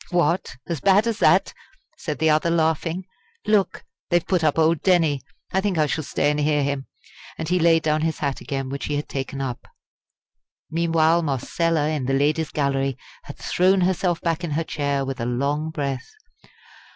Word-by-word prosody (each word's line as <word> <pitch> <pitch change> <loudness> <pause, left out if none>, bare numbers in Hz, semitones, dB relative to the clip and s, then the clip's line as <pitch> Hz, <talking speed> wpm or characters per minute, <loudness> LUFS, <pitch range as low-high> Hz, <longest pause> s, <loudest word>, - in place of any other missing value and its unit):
"What! 175 -5 +1
as 165 -5 -4
bad 200 +2 +4
as 230 -2 -1
that?" - - +4 0.4
said 155 - -4
the 160 -1 +3
other, 155 +2 +2
laughing. 165 +2 0 0.4
"Look! 210 -2 +1 0.3
they 175 - +2
have 175 - -2
put 180 -4 +1
up 155 -1 +2
old 160 -1 +3
Denny. 165 -7 +3 0.3
I 190 - +1
think 195 -3 -1
I 155 - +4
shall 155 +1 -2
stay 145 +1 +1
and 150 - -1
hear 150 -1 +2
him." 140 -1 -2 0.5
And 160 - -4
he 180 0 +2
laid 165 -1 +4
down 155 0 +1
his 160 0 -1
hat 140 -2 -2
again 135 -2 -4
which 140 - -4
he 150 - -2
had 145 - -3
taken 135 0 -4
up. 125 -3 -5 1.0
Meanwhile 165 0 +3
Marcella 155 +2 0
in 150 -5 -2
the 135 - +1
Ladies' 150 +3 +1
Gallery 135 -2 0 0.3
had - - -9
thrown 185 +1 +2
herself 180 -1 +1
back 170 0 -1
in 170 - -2
her 165 - 0
chair 140 -3 -1
with 135 -2 -4
a - - -1
long 140 +5 -1
breath. 140 -4 -3
155 Hz, 190 wpm, -23 LUFS, 140-170 Hz, 1.0 s, bad